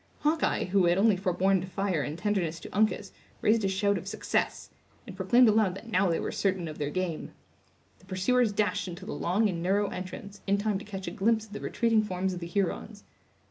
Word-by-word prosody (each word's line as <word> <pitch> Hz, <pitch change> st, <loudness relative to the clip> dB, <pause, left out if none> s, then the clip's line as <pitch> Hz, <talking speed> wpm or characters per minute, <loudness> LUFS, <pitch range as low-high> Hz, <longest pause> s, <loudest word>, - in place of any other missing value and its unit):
Hawkeye, 310 Hz, +2 st, +1 dB
who 185 Hz, 0 st, +2 dB
had 175 Hz, +1 st, +3 dB
only 210 Hz, +1 st, +4 dB
forborne 190 Hz, 0 st, +1 dB
to 185 Hz, -, -6 dB
fire 190 Hz, -3 st, -1 dB
in 150 Hz, +3 st, -4 dB
tenderness 175 Hz, -4 st, -1 dB
to -, -, -9 dB
Uncas, 210 Hz, -1 st, +1 dB, 0.3 s
raised 220 Hz, 0 st, +3 dB
a -, -, +2 dB
shout 200 Hz, +1 st, +1 dB
of -, -, -11 dB
success, -, -, -2 dB, 0.3 s
and 200 Hz, -6 st, -9 dB
proclaimed 230 Hz, +6 st, +5 dB
aloud 210 Hz, -4 st, +3 dB
that 230 Hz, +4 st, -10 dB
now 190 Hz, -2 st, +3 dB
they 165 Hz, -, +1 dB
were -, -, -3 dB
certain 190 Hz, -4 st, 0 dB
of 155 Hz, 0 st, -8 dB
their 145 Hz, -1 st, -1 dB
game. 180 Hz, -1 st, -3 dB, 0.7 s
The -, -, -21 dB
pursuers 205 Hz, +5 st, +2 dB
dashed 205 Hz, -2 st, 0 dB
into 180 Hz, +1 st, -7 dB
the 220 Hz, -, -5 dB
long 200 Hz, +6 st, +1 dB
and 175 Hz, -4 st, -3 dB
narrow 200 Hz, +3 st, +1 dB
entrance, 190 Hz, +2 st, -7 dB
in 200 Hz, +1 st, +3 dB
time 205 Hz, -1 st, 0 dB
to -, -, -10 dB
catch 195 Hz, -3 st, -6 dB
a -, -, -2 dB
glimpse 220 Hz, +3 st, +1 dB
of 210 Hz, -, -15 dB
the 210 Hz, -, -5 dB
retreating 230 Hz, -2 st, +2 dB
forms 190 Hz, -2 st, -2 dB
of 180 Hz, -, -5 dB
the 170 Hz, -, -6 dB
Hurons. 200 Hz, +3 st, -2 dB
195 Hz, 220 wpm, -29 LUFS, 180-210 Hz, 0.7 s, proclaimed